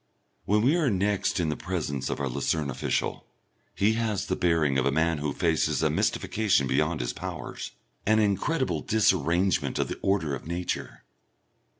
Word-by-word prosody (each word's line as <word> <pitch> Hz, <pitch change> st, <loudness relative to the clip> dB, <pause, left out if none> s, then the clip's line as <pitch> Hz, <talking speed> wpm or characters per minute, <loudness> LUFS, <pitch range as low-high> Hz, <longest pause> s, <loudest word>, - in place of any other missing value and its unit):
When 105 Hz, +2 st, +2 dB
we 140 Hz, +7 st, +4 dB
are 155 Hz, -6 st, +2 dB
next 100 Hz, -1 st, 0 dB
in 80 Hz, -3 st, 0 dB
the 75 Hz, -, -1 dB
presence 75 Hz, -7 st, -3 dB
of -, -, -3 dB
our 70 Hz, -, -1 dB
Lucerne 70 Hz, +3 st, -1 dB
official, 65 Hz, -, -2 dB, 0.5 s
he 105 Hz, +3 st, +3 dB
has 110 Hz, -3 st, -1 dB
the -, -, -1 dB
bearing 80 Hz, -6 st, +2 dB
of 65 Hz, -, 0 dB
a -, -, +2 dB
man 80 Hz, +1 st, +1 dB
who 75 Hz, 0 st, -1 dB
faces 80 Hz, +1 st, +1 dB
a -, -, +3 dB
mystification 105 Hz, -10 st, +1 dB
beyond 75 Hz, +4 st, 0 dB
his -, -, -2 dB
powers, -, -, -6 dB, 0.4 s
an 110 Hz, +1 st, +4 dB
incredible 110 Hz, -, +1 dB
disarrangement 90 Hz, -3 st, +2 dB
of -, -, 0 dB
the -, -, -5 dB
order 95 Hz, -7 st, +1 dB
of 70 Hz, -, -6 dB
Nature. 85 Hz, +1 st, -4 dB
85 Hz, 170 wpm, -27 LUFS, 75-105 Hz, 0.5 s, we